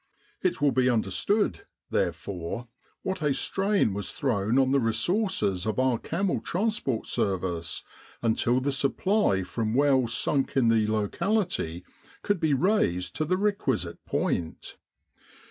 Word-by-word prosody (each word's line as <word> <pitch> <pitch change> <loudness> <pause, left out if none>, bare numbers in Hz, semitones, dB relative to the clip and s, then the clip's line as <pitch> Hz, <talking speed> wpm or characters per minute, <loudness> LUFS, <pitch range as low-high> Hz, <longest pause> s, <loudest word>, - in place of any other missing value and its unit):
It 180 -1 0
will 145 -1 +3
be 130 -1 +3
understood, 120 - 0 0.3
therefore, 95 +6 -2 0.4
what 190 -3 -3
a 145 -3 +1
strain 195 - +1
was 100 -1 -3
thrown 115 -3 0
on 130 -1 +3
the 140 - +4
resources 115 - 0
of 110 - -1
our 130 -2 +2
camel 190 +3 -1
transport 190 - -1
service 90 -4 -2 0.4
until 115 +2 +2
the 140 +2 -1
supply 140 - +1
from 110 +4 -2
wells 135 -4 +3
sunk 140 -1 0
in 120 -4 +4
the 110 -2 +3
locality 110 - -1 0.4
could 205 -3 +1
be 155 -3 +2
raised 130 - +1
to 155 - 0
the 185 +4 +1
requisite 140 - -1
point. 80 -2 -2
130 Hz, 130 wpm, -27 LUFS, -, 0.4 s, the